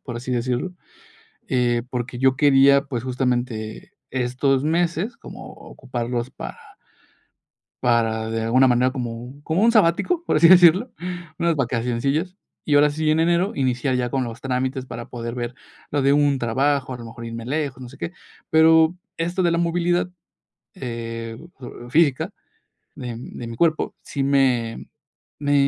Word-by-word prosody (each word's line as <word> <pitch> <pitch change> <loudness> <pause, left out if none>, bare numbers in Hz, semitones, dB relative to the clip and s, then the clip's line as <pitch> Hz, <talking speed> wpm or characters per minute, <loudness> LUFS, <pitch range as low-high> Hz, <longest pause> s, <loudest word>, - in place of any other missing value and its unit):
por 120 -4 -5
así 125 +2 -6
decirlo, 125 +7 -1 0.8
eh, 120 -2 +1
porque 125 -1 -4
yo 130 0 +3
quería, 140 0 +5
pues, 130 -5 -5
justamente, 125 -4 -2 0.2
estos 130 +2 0
meses, 170 +7 0
como - - -10
ocuparlos 120 -1 -5
para - - -8 1.3
para, 115 -2 +1
de 115 0 -2
alguna 130 +4 +4
manera, 125 +1 +3
como 125 +1 -6
como 165 +7 0
un 235 - +5
sabático, 220 - +2
por - - +2
así 170 - +7
decirlo, 180 +6 +6 0.5
unas 170 -2 +1
vacacioncillas, 135 +8 -1 0.3
y 145 - +1
ahora 150 +1 +5
sí, 155 +1 0
en 155 +1 +3
enero, 175 +4 +2
iniciar 130 0 0
ya 125 -1 -1
con 135 +1 0
los 115 -1 -6
trámites 130 0 -2
para 120 -2 -8
poder 115 -1 -5
ver 120 -1 -4 0.4
lo 145 -1 0
de 140 +1 +4
un 145 -1 +3
trabajo, 130 +3 0
a 125 - -6
lo 115 - -9
mejor, 115 +1 -9
irme 115 0 -6
lejos, 140 -2 -2
no 125 - -8
sé 135 - -14
qué. 170 - -5 0.4
Pero 160 +1 +5 0.2
esto 175 +3 -1
de 175 - +3
la 170 - +1
movilidad, 175 +1 +1 0.6
eh, 115 -5 -5 0.5
física 145 -2 +2 0.6
de 125 -2 -6
de 120 -1 -8
mi 115 0 -7
cuerpo, 160 +1 +1
sí 140 - -4
me 130 -5 +1 0.5
me 145 0 -1
130 Hz, 155 wpm, -22 LUFS, 120-155 Hz, 1.3 s, así